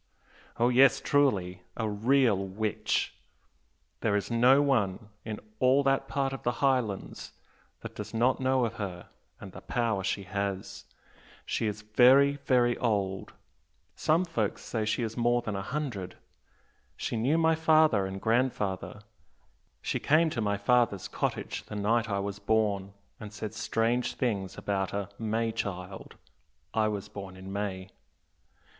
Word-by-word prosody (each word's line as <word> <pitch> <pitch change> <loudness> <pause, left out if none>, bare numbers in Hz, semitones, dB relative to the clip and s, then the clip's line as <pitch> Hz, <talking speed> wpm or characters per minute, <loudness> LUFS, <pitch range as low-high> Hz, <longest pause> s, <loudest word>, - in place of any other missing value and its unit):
Oh 120 +1 +3
yes, 130 +2 +5
truly! 100 -11 +1 0.2
a 110 - -1
real 115 +3 +3
witch! 100 +3 -1 0.9
There 105 -2 +1
is 105 +3 -2
no 125 +4 +5
one 110 -8 +1
in 110 -2 -5 0.2
all 130 +2 +4
that 135 0 +1
part 135 -1 -1
of 135 - -6
the 120 - 0
Highlands 125 -6 -1 0.5
that - - -8
does - - -7
not 120 +3 +2
know 130 -1 +2
of 115 - -3
her, 90 -4 -6 0.3
and - - -9
the - - -11
power 115 -5 -1
she 100 - -1
has! 100 0 -4 0.6
She 110 - -1
is 105 0 -4
very, 130 +6 +5
very 120 -2 +3
old 100 -5 -1 0.6
some 165 +4 +2
folks 115 - -2
say 110 -2 -2
she 110 +3 0
is 115 -1 -4
more 120 0 +2
than 105 -3 -3
a 95 - -2
hundred. 115 -7 -4 0.8
She - - -3
knew 130 +8 +2
my 160 0 +4
father 155 -10 +4
and 95 0 -6
grandfather 110 -4 -1 0.8
she - - -1
came 160 +2 +3
to 120 - -2
my 100 -1 0
father's 105 -2 +2
cottage - - -3
the 105 - -8
night 115 +3 +1
I 100 - 0
was 100 0 -4
born, 100 -2 0 0.2
and 105 -2 -8
said 105 0 -6
strange 115 +2 0
things 100 -7 -2
about 95 -2 -2
a 100 -1 -3
'May 115 +1 0
child' 95 -2 -5 0.6
I 110 -1 +2
was 105 -1 -3
born 95 -3 -9
in 95 +1 -8
May. 100 -2 -4
110 Hz, 150 wpm, -29 LUFS, 100-125 Hz, 0.9 s, yes